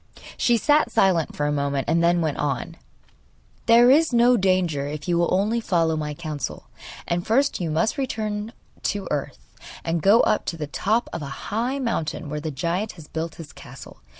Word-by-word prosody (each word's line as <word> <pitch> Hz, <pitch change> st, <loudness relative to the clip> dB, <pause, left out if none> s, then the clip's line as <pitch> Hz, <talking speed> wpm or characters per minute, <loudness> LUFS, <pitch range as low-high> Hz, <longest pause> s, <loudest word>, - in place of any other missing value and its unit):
She 240 Hz, -2 st, +2 dB
sat 295 Hz, +6 st, +3 dB
silent 180 Hz, -5 st, +2 dB
for 145 Hz, -, -1 dB
a 145 Hz, -, +1 dB
moment, 140 Hz, -2 st, -1 dB
and 165 Hz, +2 st, +2 dB
then 170 Hz, 0 st, +3 dB
went 155 Hz, -3 st, -1 dB
on: 140 Hz, -4 st, -2 dB, 0.9 s
'There 240 Hz, +2 st, +7 dB
is 310 Hz, +2 st, +4 dB
no 240 Hz, +1 st, +5 dB
danger 185 Hz, -8 st, +1 dB
if 150 Hz, +2 st, -6 dB
you 175 Hz, -, +1 dB
will 170 Hz, 0 st, +1 dB
only 210 Hz, +5 st, +1 dB
follow 165 Hz, -6 st, +1 dB
my 150 Hz, -1 st, -3 dB
counsel; 155 Hz, -2 st, -6 dB, 0.4 s
and 175 Hz, 0 st, -1 dB
first 265 Hz, +2 st, +1 dB
you 170 Hz, -, -1 dB
must 165 Hz, -, 0 dB
return 215 Hz, -4 st, -3 dB, 0.3 s
to 200 Hz, -2 st, -2 dB
earth, 145 Hz, -2 st, -3 dB, 0.5 s
and 165 Hz, 0 st, -1 dB
go 205 Hz, +6 st, +6 dB
up 215 Hz, -, +1 dB
to 165 Hz, -, -3 dB
the 155 Hz, -, -3 dB
top 215 Hz, +10 st, 0 dB
of -, -, -4 dB
a 140 Hz, -1 st, -7 dB
high 245 Hz, +5 st, 0 dB
mountain, 165 Hz, -, -3 dB
where 150 Hz, 0 st, -3 dB
the 155 Hz, -, -3 dB
giant 170 Hz, +9 st, -2 dB
has 160 Hz, -4 st, -13 dB
built 165 Hz, 0 st, -4 dB
his 150 Hz, -5 st, -11 dB
castle. -, -, -12 dB
170 Hz, 190 wpm, -23 LUFS, 150-220 Hz, 0.9 s, There